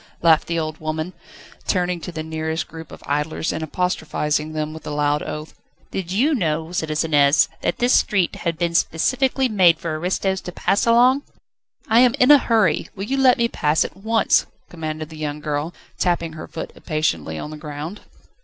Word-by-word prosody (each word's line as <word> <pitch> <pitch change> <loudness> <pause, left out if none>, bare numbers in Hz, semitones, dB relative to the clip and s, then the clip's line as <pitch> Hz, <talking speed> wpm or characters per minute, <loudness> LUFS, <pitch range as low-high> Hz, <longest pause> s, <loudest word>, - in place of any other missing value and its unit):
laughed 160 -2 +5
the 170 - -1
old 155 -1 -3
woman, 155 +3 -3 0.5
turning 180 -2 0
to 180 - -6
the 160 -2 -5
nearest 160 0 -3
group 160 -1 -10
of - - -12
idlers, 150 +3 -1
and 160 - -4
apostrophising 155 -2 -1
them 155 0 -3
with 160 - -10
a - - -3
loud 145 0 +1
oath. 155 +1 -6 0.4
"Did 180 -2 -4
you 260 +11 +2
know, 160 - -1
citizeness, 155 -3 +3
that - - -1
this 245 0 +2
street 190 -4 +2
had 170 -1 -2
been 170 0 -1
specially 255 +11 +1
made 185 -7 +4
for 160 -2 -4
aristos 190 +2 -1
to 180 - -7
pass 200 +5 0
along?" 250 +4 +5 0.7
"I 225 +1 +5
am 245 -1 +5
in 250 +3 +5
a 290 - +9
hurry, 220 - +1
will 195 - -5
you 270 +5 -1
let 260 -2 +5
me 235 - +2
pass 150 -8 +1
at - - -8
once?" 220 +3 +2 0.2
commanded 155 -2 -5
the 160 - -11
young 150 -1 -3
girl, 150 +2 -2 0.3
tapping 170 -2 0
her 155 - -8
foot 160 - -6
impatiently 85 - -2
on 150 - -6
the - - -6
ground. 150 +5 -7
165 Hz, 185 wpm, -21 LUFS, 155-195 Hz, 0.7 s, a